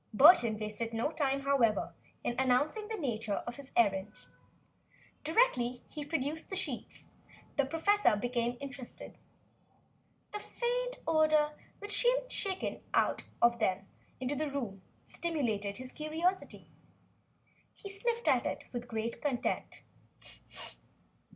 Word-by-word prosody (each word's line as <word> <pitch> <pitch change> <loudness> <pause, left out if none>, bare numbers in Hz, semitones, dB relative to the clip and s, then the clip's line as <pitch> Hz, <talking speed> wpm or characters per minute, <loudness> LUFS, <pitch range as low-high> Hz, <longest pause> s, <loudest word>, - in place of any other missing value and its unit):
Burton 240 - +8
wasted 215 +2 -3
no 230 +7 0
time, 275 -3 0
however, 270 -6 +2 0.3
in - - 0
announcing 285 - +2
the 445 0 -3
nature 225 - -1
of 240 0 -5
his 280 -1 -8
errand. 205 -2 +2 1.0
Directly 270 - +2
he 300 - -5
produced 305 +1 -2
the 385 - -3
sheets, 380 - -4 0.5
the 280 - +3
professor 330 - +3
became 240 +2 -1
interested. 275 -3 -6 1.2
The 420 - -3
faint - - -2
odor 310 -2 +4 0.3
which 410 0 -1
seemed - - +2
shaken 385 -2 -2
out - - +2
from 235 0 +4
them 195 -3 +1 0.3
into 260 +3 -1
the 305 +1 -1
room 235 -9 -4 0.2
stimulated 225 -12 -1
his 255 0 -8
curiosity. 325 +5 -1 1.1
He - - -10
sniffed 465 +4 -1
at - - +4
it - - -3
with 240 0 -4
great 225 0 -3
content. 270 -5 -1
275 Hz, 120 wpm, -33 LUFS, 235-335 Hz, 1.2 s, Burton